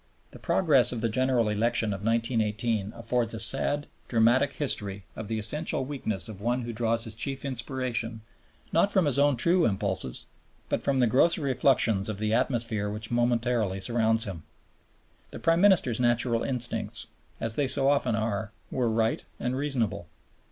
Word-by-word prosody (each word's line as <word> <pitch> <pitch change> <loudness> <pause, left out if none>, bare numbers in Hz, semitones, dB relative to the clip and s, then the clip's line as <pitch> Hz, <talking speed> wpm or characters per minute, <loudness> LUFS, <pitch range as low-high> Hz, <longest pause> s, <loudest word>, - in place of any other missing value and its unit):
The - - -13
progress 140 -9 +3
of 120 -3 -4
the 115 - 0
General 125 0 +1
Election 105 0 +1
of 100 0 -7
1918 115 -2 0
affords 115 -1 -2
a - - -5
sad, 135 +5 +1 0.2
dramatic 120 +4 +3
history 100 -9 -3
of 110 - -6
the 110 +1 -2
essential 130 +5 -1
weakness 125 -8 -3
of 105 -3 -9
one 120 +3 -1
who 120 0 -5
draws 115 0 0
his 110 -2 -5
chief 135 +5 -4
inspiration 125 -3 -3 0.5
not 200 +5 +3
from 190 -4 +3
his 140 -1 +1
own 145 -2 +3
true 170 +8 +3
impulses, 95 - -1 0.4
but - - -1
from 140 -1 0
the - - +5
grosser 145 +7 +3
effluxions 115 -6 +2
of 110 - -4
the 110 +1 -1
atmosphere 115 -4 0
which 105 +2 -5
momentarily 120 -4 0
surrounds 115 +1 +1
him. 95 -5 -5 0.9
The - - -9
Prime 165 +1 +2
Minister's 180 - +4
natural 120 -1 +1
instincts, 125 -3 0 0.3
as 115 - -1
they 145 - +1
so 135 +1 +5
often 140 -5 +2
are, 110 -1 -2 0.2
were 125 -3 0
right 110 0 0 0.2
and 125 +1 -2
reasonable. 120 -10 -1
115 Hz, 165 wpm, -27 LUFS, 110-130 Hz, 0.9 s, the